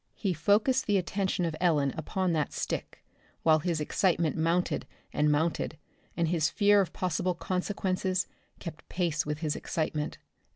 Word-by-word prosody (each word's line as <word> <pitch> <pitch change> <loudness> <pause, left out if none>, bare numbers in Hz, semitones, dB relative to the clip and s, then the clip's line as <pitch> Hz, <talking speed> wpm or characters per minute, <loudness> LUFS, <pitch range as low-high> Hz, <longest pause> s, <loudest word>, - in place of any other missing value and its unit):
He 195 -4 0
focussed 210 - +2
the 205 -2 +4
attention 190 0 0
of 165 -2 -2
Ellen 150 -6 +3
upon 180 +3 -1
that 155 -2 0
stick, - - -4 0.4
while 155 -1 +5
his 170 0 -1
excitement 165 +1 +1
mounted 170 +3 +1 0.3
and 150 0 +3
mounted, 160 +1 0 0.4
and 170 -1 +2
his 160 -1 +2
fear 205 +1 +5
of 190 - -2
possible 180 0 -1
consequences 185 0 -1 0.3
kept 160 -3 -9
pace 165 -5 0
with 150 +1 -3
his 155 -2 0
excitement. 155 -2 -2
170 Hz, 150 wpm, -29 LUFS, 155-185 Hz, 0.4 s, while